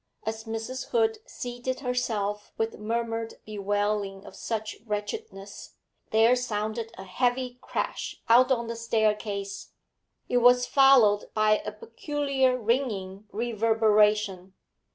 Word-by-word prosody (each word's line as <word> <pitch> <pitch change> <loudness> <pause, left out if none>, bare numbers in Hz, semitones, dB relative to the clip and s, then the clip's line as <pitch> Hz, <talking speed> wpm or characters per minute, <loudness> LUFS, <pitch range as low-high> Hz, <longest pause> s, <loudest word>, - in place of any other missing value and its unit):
As 220 +1 -4
Mrs. 225 +3 -5
Hood 445 -2 +2
seated 245 +2 -5
herself 215 -5 -2
with 225 0 -2
murmured 225 +1 -2
bewailing 205 -1 -2
of - - -12
such 220 +1 -4
wretchedness, 210 - -6 0.3
there 225 +3 +5
sounded 220 -1 -3
a 190 - -7
heavy 245 +5 -1
crash - - -4
out 250 +3 +6
on 235 -2 +1
the 230 0 -4
staircase; 210 -3 -1 0.5
it 245 - +1
was 245 +1 +5
followed 255 -8 +5
by 215 0 +4
a 210 - -5
peculiar 265 +3 -1
ringing 215 -5 -1
reverberation. 215 -4 +2
225 Hz, 110 wpm, -27 LUFS, 210-245 Hz, 0.5 s, out